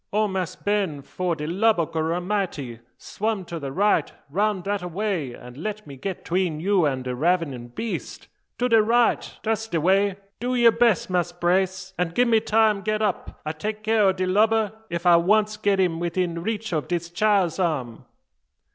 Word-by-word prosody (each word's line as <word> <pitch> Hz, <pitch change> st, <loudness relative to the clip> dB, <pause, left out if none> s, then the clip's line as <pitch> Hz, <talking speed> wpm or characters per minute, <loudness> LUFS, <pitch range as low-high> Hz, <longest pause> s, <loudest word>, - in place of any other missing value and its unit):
"O 215 Hz, +1 st, +2 dB
Mass' 185 Hz, -2 st, -3 dB
Ben! 195 Hz, -9 st, -1 dB
fo' 180 Hz, +4 st, -2 dB
de 150 Hz, -1 st, -5 dB
lub 200 Hz, +5 st, +2 dB
o' 165 Hz, -, +2 dB
Gorramity, 165 Hz, -, -2 dB, 0.2 s
swum 215 Hz, -3 st, -3 dB
to 170 Hz, -1 st, -6 dB
de 140 Hz, -2 st, -5 dB
right, 195 Hz, -1 st, +2 dB, 0.2 s
round 205 Hz, +2 st, 0 dB
dat 200 Hz, 0 st, -1 dB
away, 180 Hz, -, -3 dB
an' 125 Hz, +4 st, -11 dB
let 215 Hz, +2 st, -4 dB
me 140 Hz, -2 st, -10 dB
git 180 Hz, +8 st, -6 dB
'tween 175 Hz, -3 st, 0 dB
you 185 Hz, -2 st, +2 dB
an 130 Hz, -2 st, -2 dB
de 125 Hz, 0 st, -3 dB
ravenin' 145 Hz, -4 st, 0 dB
beast. 165 Hz, -, -5 dB, 0.3 s
To 250 Hz, -, +1 dB
de 225 Hz, -3 st, +5 dB
right! 235 Hz, +2 st, +2 dB
da's 220 Hz, 0 st, -1 dB
de 170 Hz, -6 st, -1 dB
way. 195 Hz, +4 st, +3 dB, 0.2 s
Do 250 Hz, +1 st, -1 dB
yer 235 Hz, -1 st, +6 dB
bess, 230 Hz, -3 st, +2 dB
Mass' 180 Hz, -1 st, 0 dB
Brace, 185 Hz, +2 st, 0 dB
an' 170 Hz, -2 st, 0 dB
gi' 245 Hz, -, +4 dB
me 230 Hz, -2 st, +4 dB
time 215 Hz, -2 st, +2 dB
get 215 Hz, +1 st, -1 dB
up. 205 Hz, -3 st, -3 dB
I 155 Hz, -, -1 dB
take 210 Hz, +7 st, -5 dB
care 220 Hz, -1 st, +3 dB
o' 190 Hz, -, +5 dB
de 185 Hz, 0 st, -2 dB
lubber 215 Hz, +3 st, +2 dB, 0.2 s
ef 170 Hz, +1 st, -4 dB
I 175 Hz, -1 st, +7 dB
once 210 Hz, +5 st, +2 dB
get 200 Hz, -2 st, +1 dB
im 175 Hz, -3 st, +1 dB
widin 170 Hz, 0 st, -1 dB
reach 220 Hz, +1 st, -3 dB
o' 155 Hz, -, +1 dB
dis 170 Hz, +1 st, -4 dB
chile's 195 Hz, -3 st, +2 dB
arm." 140 Hz, -10 st, -2 dB
185 Hz, 190 wpm, -24 LUFS, 165-215 Hz, 0.3 s, I